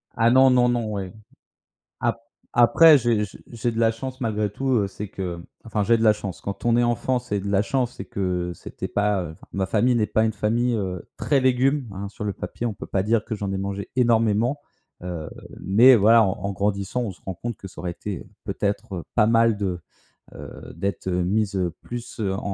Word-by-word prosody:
Ah 115 0 +4
non, 130 +1 +6
non, 125 -1 +4
non, 120 -3 0
ouais. 95 -3 -4 0.9
Ap 115 -1 0 0.3
après, 145 +6 +7
j'ai 115 -3 +1
j'ai 95 - -11
j'ai 120 0 -2
de 115 - -5
la 115 -1 +4
chance 130 +3 -7
malgré 105 -3 -1
tout, 135 +6 -4
heu, 100 -1 0
c'est 105 +1 -7
que 90 -4 -5 0.3
enfin 110 -2 -1
j'ai 115 +2 +4
de 110 - -2
la 110 -1 +6
chance, 100 -4 -6
quand 100 +3 -6
on 120 0 +3
est 120 - +4
enfant, 120 +2 +1
c'est 105 -5 -3
de 100 - -5
la 100 0 +3
chance, 125 0 -1
c'est - - -6
que 90 -2 -2
c'était - - -7
pas, 105 -2 +1
heu, 80 - -6
enfin, - - -17
ma 95 -1 -1
famille 120 +5 +2
n'est 110 -3 +2
pas 110 - +1
une 110 - +1
famille, 115 +4 0
heu, 95 -4 -4
très 140 -3 +1
légumes, 130 0 +2
hein. 100 +1 -5
Sur 105 - -8
le 100 - -1
papier, 120 - -5
on 110 - -2
peut - - -8
pas 95 - 0
dire 110 +1 +1
que 110 - -4
j'en 100 -2 -3
ai - - -1
mangé 100 +1 -4
énormément. 115 +2 +2 0.4
Heu, 85 -4 -5 0.3
mais 120 +7 +6
voilà, 115 +2 +6
en 100 +1 -2
grandissant, 100 +4 -1
on 110 - -3
se - - -20
rend 95 - -5
compte 115 +5 -5
que 95 - -9
ça - - -11
aurait 90 -1 -3
été 100 +1 -6 0.2
peut-être, 100 -1 -2
heu, 85 - -5
pas 105 -3 +4
mal 115 -1 +4
de, 95 -4 -2 0.6
heu, - - -10
d'être, 100 -1 -3
heu, 90 -1 0
mis, 105 +2 +1
heu, 90 -3 -1
plus, 120 -1 -8
heu, 100 -3 0
en 95 - -3
105 Hz, 225 wpm, -24 LUFS, 95-120 Hz, 0.9 s, après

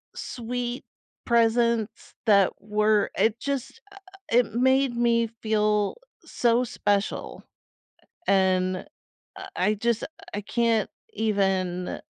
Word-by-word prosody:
sweet 245 +1 -4 0.4
presents 230 -1 +1
that 200 -4 +5
were 210 0 +1
it 220 +3 +2
just 280 - -4
uh, - - -13 0.3
it 235 -2 +3
made 260 0 +3
me 235 -1 +2
feel 210 -1 +1 0.3
so 240 +1 +2
special, 205 -2 -2 0.8
and 185 -1 +2 0.6
I - - -8
I 210 - +2
just 230 +2 0 0.3
I 205 - -3
can't 230 0 +1 0.2
even 190 -4 0
220 Hz, 100 wpm, -26 LUFS, 205-235 Hz, 0.8 s, that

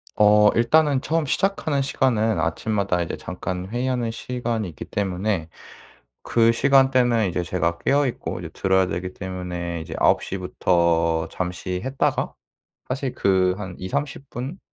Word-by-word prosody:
어 105 0 +6
일단은 140 +3 +3
처음 160 +2 0
시작하는 155 -2 0
시간은 115 - +1
아침마다 100 +2 0
이제 85 - -5
잠깐 90 0 -5
회의하는 120 0 -1
시간이 120 -3 -3
있기 75 - -8
때문에 95 -3 -2 0.7
그 115 -1 +3
시간대는 125 -4 +3
이제 90 0 -2
제가 85 -1 -1
깨어 140 0 +2
있고 120 - -4
이제 - - -7
들어야 95 -1 +2
되기 90 +1 -4
때문에 90 -2 -5
이제 80 - -7
9 - - +3
시부터 85 -3 +1
잠시 90 0 -3
했다가 135 +1 -1 0.5
사실 130 0 -2
그 95 -1 +2
한 95 -3 -6
20-30 140 +9 -4
분 135 +10 -6
105 Hz, 290 characters per minute, -23 LUFS, 90-130 Hz, 0.7 s, 어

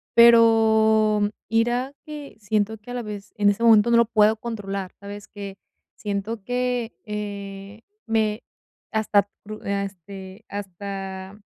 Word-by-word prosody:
pero 220 -2 +6 0.2
ira 240 +4 +1
que 295 -4 -9
siento 215 0 0
que 215 +4 -11
a - - -4
la 245 - -2
vez, 205 -1 -7
en 205 -1 +4
ese 205 +3 0
momento, 225 0 +6
no 235 - +6
lo 235 - +6
puedo 215 -1 +4
controlar, 200 -5 -5
¿sabes 200 0 -9
qué? 200 -1 -8 0.4
Siento 205 +1 -3
que, 245 -1 -1
eh, 200 0 -6 0.3
me 220 0 +1 0.5
hasta 205 -2 +2 0.2
pru 215 +1 -8
ah, 200 0 0
este, 190 +2 -10
hasta, 195 0 -6
210 Hz, 135 wpm, -24 LUFS, 200-225 Hz, 0.5 s, pero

